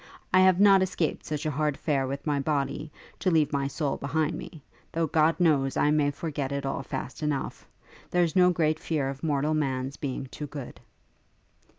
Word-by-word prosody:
I 185 - +7
have 185 -1 +5
not 195 -1 +7
escaped 180 -4 -1
from 150 - -1
such 150 - -7
hard 150 0 0
fare 140 -4 0
with 140 +1 -5
my 145 -2 +1
body, 145 +1 -2 0.3
to 190 - +1
leave 155 -4 +2
my 140 -1 +1
soul 140 0 -2
behind 155 +3 -1
me; 155 -4 -9 0.3
though, 165 0 +1
God 160 +2 +2
knows, 145 -6 +2
I 150 - +3
may 150 -1 +3
forget 145 -2 -4
it 140 0 -2
all 135 - -2
fast 135 +1 -6
enough. 150 -3 -3 0.4
There's 175 -1 +1
no 180 -1 +6
great 155 -3 +1
fear 145 -5 -1
of 135 0 -7
mortal 150 0 +1
man's 135 -3 -1
being 135 -1 -4
too 150 - -6
good.' 140 -3 -8
150 Hz, 190 wpm, -27 LUFS, 140-160 Hz, 0.4 s, I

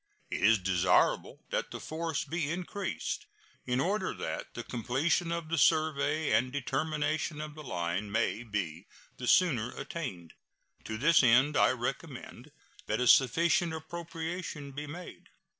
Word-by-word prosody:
It - - -2
is 110 +2 +6
desirable 90 -1 +2
that - - -1
the - - -7
force 160 -1 -3
be 160 -3 -2
increased, 180 +3 -3 0.4
in 125 0 +1
order 190 +6 0
that - - -5
the 120 - -4
completion 135 - 0
of 170 -2 -3
the 165 -1 +1
survey 155 0 +2
and 125 +2 +3
determination 150 +3 -1
of 155 0 -5
the 155 - -10
line 90 - -3
may 110 - 0
be 100 -6 -4 0.3
the 125 - -5
sooner 125 -11 +4
attained. 130 - -6 0.5
To 110 - -4
this 150 +7 +5
end 125 +4 +5
I - - +5
recommend - - -5 0.4
that 110 - 0
a 125 - +1
sufficient 165 +7 +4
appropriation 165 -2 -5
be 145 +2 -6
made. 175 +5 -9
145 Hz, 140 wpm, -31 LUFS, 120-165 Hz, 0.5 s, is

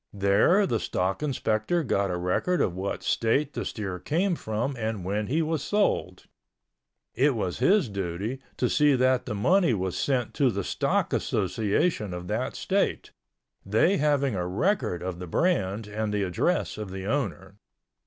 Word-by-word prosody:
There 100 - +4
the 115 - 0
stock 95 +4 -1
inspector 135 +2 0
got 100 -6 0
a 90 - -1
record 90 - 0
of 90 - +1
what 95 +2 -3
state 135 +6 +1
the - - -3
steer 95 -4 -4
came 175 - 0
from 120 -1 -2
and 110 -5 -3
when 105 +2 -1
he 160 +5 +1
was 160 -2 -1
sold. 175 - 0 0.9
It 135 +2 +2
was 95 -4 -2
his 185 - +4
duty 100 +5 -4 0.2
to 125 - +1
see 145 +2 +4
that 130 0 +2
the 105 - -2
money 170 - +3
was 95 -2 -2
sent 125 +5 0
to 135 -3 +3
the 100 -4 -2
stock - - 0
association 105 - 0
of 90 0 -7
that 110 +4 -2
state, 195 +1 -1 0.5
they 110 - +3
having 140 -3 +2
a 90 -3 -2
record 95 - 0
of 90 -1 -4
the 90 - -6
brand 105 - 0
and 105 +1 -3
the 105 -1 0
address 90 +3 0
of 105 -2 -5
the 95 0 -6
owner. 100 -6 -3
110 Hz, 165 wpm, -27 LUFS, 95-145 Hz, 0.9 s, There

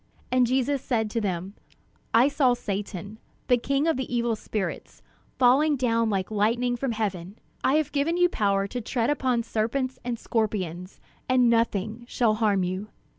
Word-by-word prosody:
And 250 -1 +4
Jesus 265 +2 +1
said 220 -5 -1
to 230 - -1
them: 190 -1 -3 0.6
"I 235 +4 +5
saw 275 -3 +3
Satan, 205 -1 -5 0.3
the 245 - +5
king 275 +4 0
of 325 -4 +2
the 260 -2 -4
evil 235 -1 +1
spirits, 210 -2 -5 0.3
falling 275 +4 +4
down 230 -3 +1
like 195 -1 -1
lightning 235 +4 +1
from 245 0 -2
heaven. 200 -3 -3 0.3
I 270 - +3
have 310 -2 +1
given 295 +5 0
you 355 0 +5
power 200 - +1
to 245 +5 -4
tread 235 +3 0
upon 255 -5 0
serpents 255 +4 -2
and 240 -1 -3
scorpions, 190 -6 -3 0.3
and 250 -2 +4
nothing 230 0 0
shall 235 -3 +2
harm 210 -3 +1
you. 185 +3 -3
230 Hz, 165 wpm, -26 LUFS, 210-255 Hz, 0.6 s, I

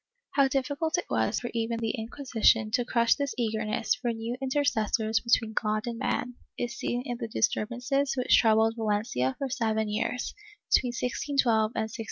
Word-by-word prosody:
How 275 -1 +4
difficult 285 +5 -1
it 350 - -2
was - - +1
for 240 - -5
even 230 0 -1
the 225 -1 -1
Inquisition 225 -2 +1
to 245 +2 +2
crush 235 -1 +3
this 280 -5 -3
eager 220 -2 -1
ness 215 0 0
for 245 -1 -2
new 230 +1 -4
intercessors 225 -5 +1
between 225 -2 +1
God 215 -1 0
and 235 -1 -4
man, 250 0 -1 0.2
is 245 +2 -3
seen 245 -1 -2
in 245 -2 -3
the 230 - -3
disturbances 245 +5 0
which 250 - +4
troubled 225 0 +4
Valencia 205 - 0
for 275 - -2
seven 220 -4 0
years, 220 +4 -2 0.4
between 250 - +4
1612 240 - -5 0.8
and 225 - 0
1619. 220 - -6
235 Hz, 175 wpm, -28 LUFS, 220-250 Hz, 0.8 s, How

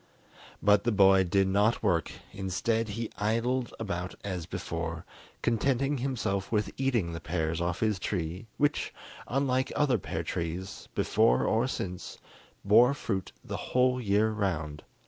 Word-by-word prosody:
But 105 0 +5
the 120 - +2
boy 95 -2 +6
did 95 +2 +2
not 105 +5 +2
work; 85 -6 +1 0.2
instead, 105 +4 -1
he 115 +2 -4
idled 115 +4 0
about 90 -5 -3
as 90 -4 -4
before, 85 -1 -4 0.4
contenting 135 +4 +1
himself 115 -7 -2
with 105 -2 +1
eating 120 -10 0
the 85 - -4
pears 80 0 -2
off 85 0 -1
his 110 -4 +1
tree, 90 +1 -3
which, 145 0 +1 0.4
unlike 130 0 +1
other 140 -6 +2
pear 80 -1 -4
trees 85 +3 -4
before 110 +2 +3
or 115 +3 +2
since, 90 -8 -5 0.5
bore 120 +7 +6
fruit 100 -9 -3
the - - -4
whole 125 0 +1
year 105 0 +2
round. 80 -8 -2
105 Hz, 140 wpm, -29 LUFS, 90-120 Hz, 0.5 s, boy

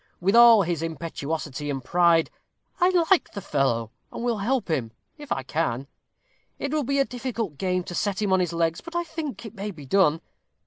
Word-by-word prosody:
With 195 +4 +2
all 235 -3 +8
his 170 -2 -2
impetuosity 155 -2 -4
and 135 -2 -3
pride, 170 0 +3 0.5
I 360 - +5 0.2
like 380 - +4
the - - -4
fellow, 125 - 0 0.2
and - - -6
will 235 -3 0
help 235 +2 0
him, 130 -9 -1 0.3
if 295 - -11
I 135 - -1
can. 135 -2 -2 0.7
It 280 - -3
will 305 - +1
be 275 +2 0
a 275 - +3
difficult 235 - -4
game 185 -1 0
to 175 - -8
set 195 +1 -1
him 205 -3 +1
on 190 - +4
his 180 -2 0
legs, 165 -1 0
but 335 0 -11
I 345 - +1
think 315 -6 -6
it 220 - -8
may 205 -1 -5
be 155 -8 -10
done. 165 0 +3
180 Hz, 200 wpm, -25 LUFS, 155-235 Hz, 0.7 s, all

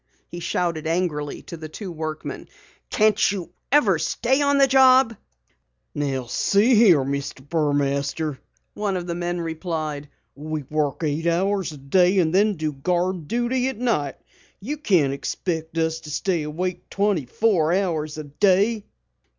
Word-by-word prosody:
he 175 - -7
shouted 170 -2 -2
angrily 160 -4 -2
to - - -8
the 160 -1 -8
two 190 +4 -7
workmen. 155 -1 -5 0.4
"Can't 215 -2 +3
you 180 -4 -5 0.2
ever 215 - +4
stay 260 - +1
on 285 0 +3
the 275 - +6
job?" 260 -2 +5 0.8
"See 145 - +1
here, 205 - +6
Mr. 140 0 -4
Burmaster," 145 -1 0 0.3
one 205 -3 -2
of 175 - -5
the 175 - -3
men 175 0 -3
replied. 160 -3 -4 0.2
"We 155 +1 -5
work 150 +2 -2
eight 155 +2 -1
hours 190 +1 +1
a 150 - -10
day 180 +7 +3
and 165 -3 +2
then 205 +2 +3
do 155 -2 -2
guard 175 +3 -1
duty 245 - 0
at 265 - -3
night. 180 - 0 0.4
You 280 +10 -4
can't 175 - +2
expect 160 +3 -4
us 160 0 0
to 155 - -11
stay 170 +3 -1
awake 175 +5 -4
twenty 200 -9 0
four 175 - +2
hours 165 -5 -1
a 155 - -5
day!" 200 +8 +2
170 Hz, 150 wpm, -23 LUFS, 150-200 Hz, 0.8 s, the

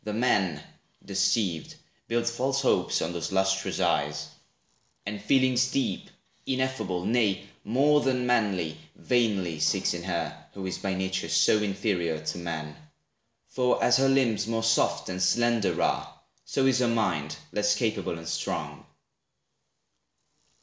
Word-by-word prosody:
The 105 - -4
man, 95 -9 +1 0.4
Deceived, 95 -3 0 0.3
builds 115 0 0
false 135 +3 -1
hopes - - +2
on 85 - -3
those 85 +1 -4
lustrous 95 0 0
eyes, - - 0 0.8
And 105 0 -5
feelings 130 +2 +3
deep, 130 -8 -2 0.4
ineffable, 130 -9 -1
nay, 105 -3 +1 0.2
more 145 +6 +3
Than 130 -2 0
manly, 95 -10 0 0.2
vainly 100 -10 0
seeks - - +1
in 85 - -5
her, 85 -3 -2 0.2
who 95 -1 -6
is 95 - -4
By 95 -1 -2
nature 95 -2 -2
so 105 +6 +4
inferior 95 -6 -1
to 80 +2 -4
man. 80 -3 -5 0.7
For 125 -1 +1
as 125 - +5
her 135 0 +3
limbs 115 -6 +2
more 115 0 -1
soft 115 -7 +2
and 90 0 -4
slender 105 -1 +2
are, - - -1 0.3
So 135 - 0
is 130 -2 +3
her 125 - +2
mind 90 -10 0
less 105 0 +2
capable 105 -7 -1
and 80 0 -9
strong. - - -3
105 Hz, 135 wpm, -27 LUFS, 90-120 Hz, 0.8 s, as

